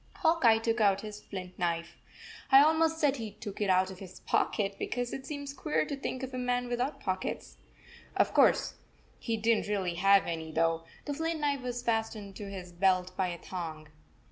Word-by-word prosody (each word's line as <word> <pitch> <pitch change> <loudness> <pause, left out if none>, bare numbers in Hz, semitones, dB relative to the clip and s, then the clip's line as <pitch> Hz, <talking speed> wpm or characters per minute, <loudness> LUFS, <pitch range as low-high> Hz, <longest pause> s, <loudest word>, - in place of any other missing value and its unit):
Hawk 330 -2 +2
Eye 225 -1 +7
took 225 0 0
out 200 -2 +4
his 210 -1 -8
flint 185 -2 -8
knife. 170 -1 -1 0.6
I 270 - +9
al 300 +3 +7
most 320 0 +2
said 285 -3 +2
he 225 -3 -5
took 205 0 -8
it 205 - +1
out 185 0 +3
of 185 - -10
his 185 -2 -11
pocket, 195 -2 0
be - - -2
cause 245 0 -3
it 265 - -6
seems 285 -2 -5
queer 155 - 0
to 285 - -3
think 270 -1 -4
of 260 0 -5
a 255 - -3
man 245 0 0
without 245 +4 -1
pockets. 185 0 -4 0.6
Of - - +3
course, - - +4 0.4
he 230 -2 -2
did 225 +1 +3
n - - -4
t - - -8
really 190 -4 0
have 195 0 +6
any, 160 -1 -4
though. 165 +1 +1 0.2
The 290 - -2
flint 325 +2 -2
knife 285 -2 0
was 245 -1 -4
fas 225 -1 0
tened 200 -2 -9
to 205 -2 -6
his 185 -2 -7
belt 185 0 +1
by 190 -1 +1
a 175 -1 -4
thong. 160 -4 -6
210 Hz, 220 wpm, -30 LUFS, 185-255 Hz, 0.6 s, I